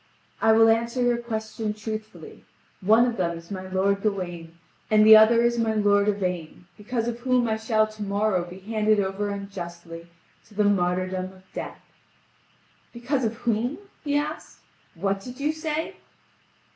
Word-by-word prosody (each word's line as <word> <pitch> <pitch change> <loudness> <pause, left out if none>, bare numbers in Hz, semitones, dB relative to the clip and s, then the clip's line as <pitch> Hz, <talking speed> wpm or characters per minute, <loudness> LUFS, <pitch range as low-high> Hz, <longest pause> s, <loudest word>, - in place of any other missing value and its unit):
"I 220 - +5
will 225 0 +6
answer 235 +2 +1
your 245 -1 +2
question 220 -2 -4
truthfully: 215 0 -8 0.4
one 220 +5 +5
of 240 -2 -2
them 170 -2 -1
is 170 +3 -13
my 185 -1 -5
lord 195 +1 0
Gawain, 175 -5 -4 0.3
and 215 0 +5
the 220 0 +10
other 225 +2 +6
is 235 0 +1
my 220 -1 +1
lord 205 -1 +3
Yvain, 180 -4 -3
because 230 +2 -3
of 240 0 -3
whom 250 -1 +1
I 220 - +1
shall 220 -1 +2
to 215 0 -12
morrow 200 -2 0
be 175 +1 -10
handed 215 +1 +1
over 200 +1 -1
unjustly 175 -4 -7 0.4
to 210 - -19
the 210 - +2
martyrdom 185 -1 0
of 185 0 -13
death." - - -7 1.1
"Because 250 +3 -2
of 225 +1 -2
whom?" 235 +4 -1 0.3
he 290 -1 0
asked, 300 +2 -5 0.3
"what 195 +3 -1
did 250 +6 -10
you 295 +2 +1
say?" 315 0 -3
215 Hz, 160 wpm, -25 LUFS, 190-235 Hz, 1.1 s, the